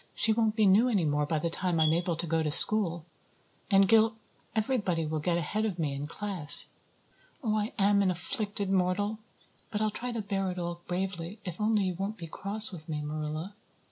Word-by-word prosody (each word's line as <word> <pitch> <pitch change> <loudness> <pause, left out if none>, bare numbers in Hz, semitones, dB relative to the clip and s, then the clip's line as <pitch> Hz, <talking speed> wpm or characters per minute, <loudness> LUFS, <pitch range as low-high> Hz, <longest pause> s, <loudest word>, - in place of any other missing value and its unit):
She 220 - +3
won't 220 -1 0
be 215 -2 +3
new 205 +6 +4
any 200 -8 +1
more 150 0 0
by 160 - 0
the 165 +2 -2
time 175 -1 0
I'm 155 0 +3
able 170 0 -1
to 170 - -2
go 165 0 0
to 155 - -1
school. 170 0 +3 0.6
And 195 -1 +4
Gil 225 +1 +4 0.4
everybody 210 -8 0
will 155 0 -3
get 170 +3 0
ahead 190 +6 -2
of 205 -5 -2
me 150 -4 -2
in 140 +1 -5
class. 185 -4 +5 0.7
Oh, 215 -3 0
I 215 +1 -1
am 200 0 +3
an 195 - +2
afflicted 200 +2 -3
mortal. 195 +3 0 0.5
But 210 - -3
I'll 215 0 0
try 245 +4 -5
to 230 -3 -4
bear 195 -1 -2
it 180 - -6
all 175 -1 -5
bravely 180 +1 -4
if 180 +2 -6
only 215 -1 +2
you 185 -1 -1
won't 195 +5 -5
be 170 - -8
cross 205 +6 0
with 165 -3 -10
me, 150 -1 -3
Marilla." 155 +5 -5
190 Hz, 205 wpm, -29 LUFS, 165-210 Hz, 0.7 s, class